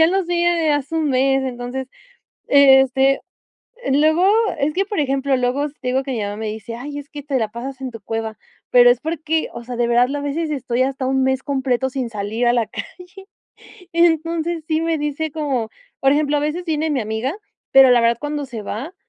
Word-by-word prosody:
ya 320 - +7
los 380 0 0
vi 345 0 0
hace 315 -4 +1
un 315 -2 +1
mes". 270 +1 +2
Entonces, 250 +1 -5 0.6
este, 270 -1 +5 0.7
luego 310 +5 +3 0.3
es 295 +2 0
que, 390 +4 0
por 405 -3 -3
ejemplo, 275 -1 +1
luego, 250 +3 0
s 295 0 -8
te 250 - -2
digo 260 +2 +1
que 270 - -5
mi 240 - -2
mamá 205 0 -3
me 220 0 -4
dice: 220 +1 -6
"Ay 285 +4 -7
es 285 +1 -11
que 295 -2 -8
te 275 -1 -1
la 220 -2 -1
pasas 260 +3 -7
en 260 - -4
tu 225 -2 -10
cueva", 225 +1 -4 0.3
pero, 245 0 +7
es 245 0 -1
porque, 320 0 -2
o 235 - -7
sea, 245 +1 -6
de 240 - +2
verdad 245 +3 +2
a 290 - -3
veces 300 +3 -2
estoy 255 -3 -1
hasta 265 0 -2
un 265 0 +1
mes 265 0 0
completo 265 -2 0
sin 255 -2 -3
salir 215 +2 -2
a 240 - +4
la 235 -2 +1
calle. 365 +2 -10 0.7
Entonces, 335 0 +1
sí 315 -1 +1
me 330 0 0
dice 295 +2 -2
como 275 -7 -2 0.3
por 270 0 +4
ejemplo, 295 0 +1
a - - -1
veces 305 +4 -2
viene 320 -1 -1
mi 280 -4 0
amiga, 220 +6 -2 0.4
pero 270 -1 +8
la 245 -1 +5
verdad 230 0 +2
cuando 295 -1 -3
se 235 -5 -7
va, 255 - -6
270 Hz, 215 wpm, -20 LUFS, 245-305 Hz, 0.7 s, pero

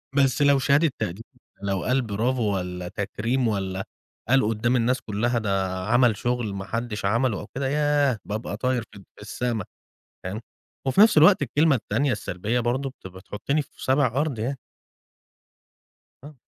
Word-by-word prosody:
بس 135 -1 +3
لو 140 -1 +5
شهادة 140 +4 +3
تقدير، 95 +7 -3 0.4
لو 100 -2 -1
قال 130 +1 +2
برافو 110 -1 0
والّا 90 -1 -4
تكريم 115 +6 -1
والّا 95 -3 -2 0.5
قال 135 +1 +5
قدّام 115 +3 +1
الناس 125 +1 +1
كلها 115 +3 -1
ده 95 -3 -1
عمل 120 -2 +4
شغل 120 -4 -1
ما 95 0 -5
حدش 115 -1 -3
عمله 115 0 +1
أو - - -8
كده، 135 0 -1
ياه 145 -4 +2
باب 105 +2 -4
طاير 125 -2 0
فد 100 - -12
في - - -16
السما، 110 0 -3 0.6
تمام. 100 +5 -5 0.5
وفي 160 +9 +4
نفْس 215 -7 +6
الوقت 180 +4 +7
الكلمة 145 +3 +3
التانية 130 +4 0
السلبية 105 +3 -2
برضو 125 +3 -1
بت 130 - -12
بتحطني 105 +10 -3
في 140 - -13
سابع 135 +1 +3
أرض 135 +1 -1
يعني. 130 +5 -2 1.7
آه. 150 - -11
120 Hz, 155 wpm, -25 LUFS, 105-135 Hz, 1.7 s, الوقت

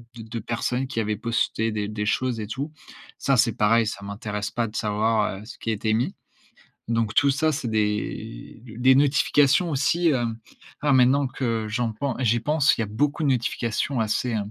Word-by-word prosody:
de 115 - -8
de 115 +1 -6
personnes 125 +4 -2
qui 130 -3 -3
avaient 105 -1 -1
posté 115 0 -1
des 105 -1 -2
des 105 -1 -3
choses 125 -1 0
et 105 - -4
tout. 140 +7 -4 0.5
Ça, 135 -1 +1
c'est 115 -1 +3
pareil, 115 +2 +3
ça 100 -1 -5
m'intéresse 105 0 -4
pas 120 -1 -1
de 105 - -12
savoir, 105 -1 0
heu, - - -12
ce - - -11
qui 115 - -2
a - - +1
été 110 +1 -1
mis. 125 - 0 0.7
Donc 115 -2 0
tout 140 +4 +4
ça, 155 +3 +1
c'est 135 -4 -3
des 110 +1 -3
des 125 +4 +3
notifications 145 +3 +3
aussi, 160 +5 +2
hem 120 -5 -1 0.4
alors 145 -2 +3
maintenant 130 +2 +4
que 115 -4 -2
j'en 115 +1 -1
pen 130 +4 -3
j'y 120 -2 +2
pense, 150 +3 +3
il - - +1
y - - 0
a - - -6
beaucoup 145 +9 -1
de - - +2
notifications 120 +1 -1
assez, 110 +3 0
hem, 105 -3 -2
115 Hz, 205 wpm, -24 LUFS, 110-135 Hz, 0.7 s, tout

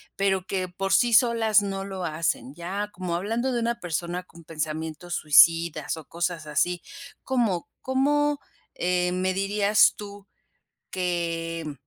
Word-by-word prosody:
pero 190 -2 0
que 190 -1 -2
por 195 +2 -2
sí 240 -1 +4
solas 225 -2 +4
no 195 -1 -3
lo 190 -2 -5
hacen. 155 -4 -2
Ya 190 +6 -4
como 180 -1 -3
hablando 225 +8 -1
de 240 - 0
una 235 +1 -1
persona 175 0 -3
con 170 -2 -17
pensamientos 160 +2 -4
suicidas 160 +1 +4
o 160 - -10
cosas 170 -1 -3
así, 170 +4 0 0.4
¿cómo 230 -10 0
cómo, 290 +2 +1 0.4
eh, 180 0 0
me 185 +1 0
dirías 200 +2 +3
tú 200 -1 -10 0.6
que, 170 -2 -2
mm, 150 - -5
180 Hz, 140 wpm, -25 LUFS, 170-205 Hz, 0.6 s, sí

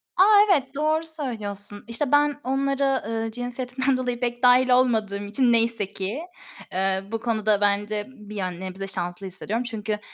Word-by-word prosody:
A, 370 - +6 0.3
evet, 275 -5 +1
doğru 310 +2 +1
söylüyorsun. 215 -10 -5
İşte, 235 +4 -2
ben 290 0 +3
onlara, 270 +1 0
ııı, 225 0 -2
cinsiyetimden 250 +2 -2
dolayı 245 -2 -2
pek 240 0 -3
dâhil 250 +1 +6
olmadığım 220 -5 +2
için 240 +4 +2
neyse 230 -2 +2
ki, 200 +8 -3 0.5
ııı, 190 +1 0
bu 225 - -1
konuda 215 -3 +1
bence 205 +1 +1
bir 210 -2 -11
yön 185 -3 -3
nebze 190 +1 -6
şanslı 185 0 -4
hissediyorum 215 +6 -3
çünkü 215 -3 -3
230 Hz, 155 wpm, -24 LUFS, 205-260 Hz, 0.5 s, A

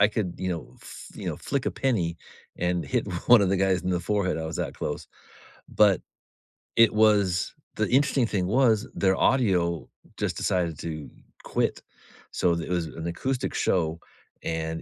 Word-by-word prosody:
I 100 - +6
could, 100 -5 -2
you 95 - -2
know, 85 -3 -5
fl - - -11
you - - -3
know, - - -3
flick 140 -2 -2
a - - +2
penny 90 -11 0 0.4
and 90 0 0
hit 125 -3 0 0.2
one 120 -4 +8
of 95 - +2
the 100 - +2
guys 95 -1 +2
in 95 - -1
the 90 - 0
forehead, 95 -1 0
I 80 - -3
was 80 - -4
that - - -3
close. - - -4 0.6
But 100 -4 +4 0.8
it 115 -2 +6
was 105 -4 +3 0.2
the - - 0
interesting 135 -2 +3
thing 95 -5 -1
was 115 0 +3
their 95 -1 +2
audio 90 - +2 0.3
just - - -2
decided 85 -4 0
to 80 -3 -5 0.3
quit. - - -1 0.5
So, 85 -1 +2
th 85 - -3
it - - -3
was 85 -2 0
an 80 +2 -6
acoustic 130 +9 -2
show, 85 -2 +1 0.4
and 80 0 -3
95 Hz, 180 wpm, -26 LUFS, 85-110 Hz, 0.8 s, one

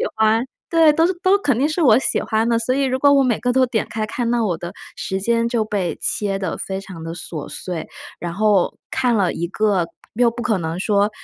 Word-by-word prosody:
欢 220 +1 +3 0.3
对， 325 -2 +5
都 325 +2 +3
是 365 - +1
都 380 +1 +4
肯 275 - +1
定 280 - +3
是 320 +3 -1
我 240 -8 +6
喜 - - 0
欢 220 0 0
的， 230 - +3
所 230 +2 0
以 275 +1 +1
如 260 0 0
果 285 +1 +5
我 275 -1 +5
每 245 -4 +1
个 245 - 0
都 260 0 +4
点 235 -3 -1
开 220 -1 -2
看， 235 +2 -2
那 240 -1 +1
我 180 -6 0
的 175 +3 -7 0.2
时 190 - -3
间 230 +2 +1
就 235 -2 0
被 200 -5 -2
切 195 -2 -1
得 185 -4 -3
非 190 0 -4
常 185 -4 -10
地 165 0 -5
琐 160 -3 -6
碎。 175 -3 -5 0.3
然 175 -1 -4
后 205 -1 +2
看 250 -3 +1
了 195 -4 +2
一 170 - -3
个 200 -2 +1 0.3
又 235 +1 +3
不 240 - -6
可 230 -4 +1
能 165 0 -3
说 205 +1 +2
220 Hz, 255 characters per minute, -20 LUFS, 190-250 Hz, 0.3 s, 我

